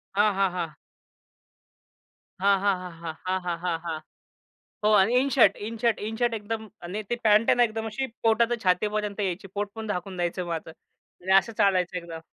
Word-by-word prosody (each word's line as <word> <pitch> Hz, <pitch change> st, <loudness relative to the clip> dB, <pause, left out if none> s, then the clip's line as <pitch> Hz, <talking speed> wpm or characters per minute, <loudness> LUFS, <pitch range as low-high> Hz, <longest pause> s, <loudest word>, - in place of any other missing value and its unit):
हां, 205 Hz, 0 st, +4 dB
हां, 195 Hz, -2 st, +2 dB
हां. 165 Hz, -4 st, -4 dB, 1.6 s
हां, 200 Hz, -1 st, +4 dB
हां, 200 Hz, -1 st, +2 dB
हां, 180 Hz, -1 st, -7 dB, 0.4 s
हां, 185 Hz, 0 st, +1 dB
हां, 170 Hz, -1 st, -1 dB
हां, 170 Hz, -2 st, -1 dB
हां. 160 Hz, -2 st, -3 dB, 0.8 s
हो 215 Hz, -, +4 dB
आणि 210 Hz, +6 st, +4 dB
in 275 Hz, +1 st, +1 dB
shirt 265 Hz, -3 st, +5 dB
in 230 Hz, 0 st, -6 dB
shirt. 230 Hz, 0 st, +1 dB
In 220 Hz, +2 st, -4 dB
shirt 240 Hz, -1 st, +2 dB
एकदम 220 Hz, 0 st, -5 dB, 0.2 s
आणि 205 Hz, +4 st, -3 dB
ते 240 Hz, -, +1 dB
पँट 215 Hz, +1 st, +5 dB
आहे -, -, +6 dB
ना 245 Hz, -, +5 dB
एकदम 225 Hz, 0 st, -4 dB
अशी 265 Hz, +4 st, -2 dB, 0.2 s
पोटा 225 Hz, +1 st, +5 dB
ते 240 Hz, -, +1 dB
छातीपर्यंत 210 Hz, +3 st, 0 dB
यायची. 190 Hz, +2 st, -3 dB
पोटपण 210 Hz, +2 st, -4 dB
झाकून 180 Hz, +1 st, -5 dB
जायचं 175 Hz, +1 st, -2 dB
माझं 165 Hz, -1 st, -4 dB
आणि 180 Hz, +3 st, -10 dB
असं 220 Hz, +4 st, -8 dB
चालायचं 185 Hz, -2 st, +2 dB
एकदम. 165 Hz, -2 st, -7 dB
200 Hz, 185 wpm, -26 LUFS, 180-220 Hz, 1.6 s, आहे